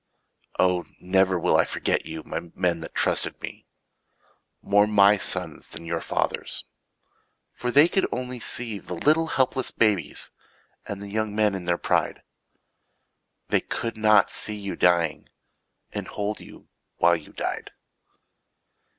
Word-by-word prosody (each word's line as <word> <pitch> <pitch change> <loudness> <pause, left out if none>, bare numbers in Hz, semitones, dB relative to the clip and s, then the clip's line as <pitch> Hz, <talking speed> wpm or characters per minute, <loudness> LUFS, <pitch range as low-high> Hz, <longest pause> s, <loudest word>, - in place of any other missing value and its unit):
Oh, 90 -1 +2
never 95 0 +2
will 85 - +2
I - - +5
forget - - -1
you, 80 -1 -6
My 85 +2 -5
men 90 -2 +1
that 80 - -9
trusted - - +1
me. - - -8 1.0
More 105 +1 +4
my 100 -1 +6
sons - - -3
than 85 - -9
your 85 0 -2
fathers'. - - -2 0.9
For 125 - -3
they 145 +6 +7
could 190 +2 +1
only 125 0 -4
see 115 -2 -1
The 90 - -7
little 155 - +3
helpless 130 -3 +1
babies 105 -8 +1 0.6
And 100 0 -5
the 100 - -7
young 110 -1 -1
men 105 -1 +3
in 95 -2 -5
their 85 0 +1
pride. - - 0 1.3
They - - +3
could 115 - -4
not 110 -2 +4
see 105 - -3
you 100 -1 -5
dying. 85 -3 +2 0.6
And - - -4
hold 105 +1 -3
you - - -14 0.3
while 85 +1 +5
you 80 -3 -9
died. - - -4
100 Hz, 140 wpm, -25 LUFS, 90-110 Hz, 1.3 s, they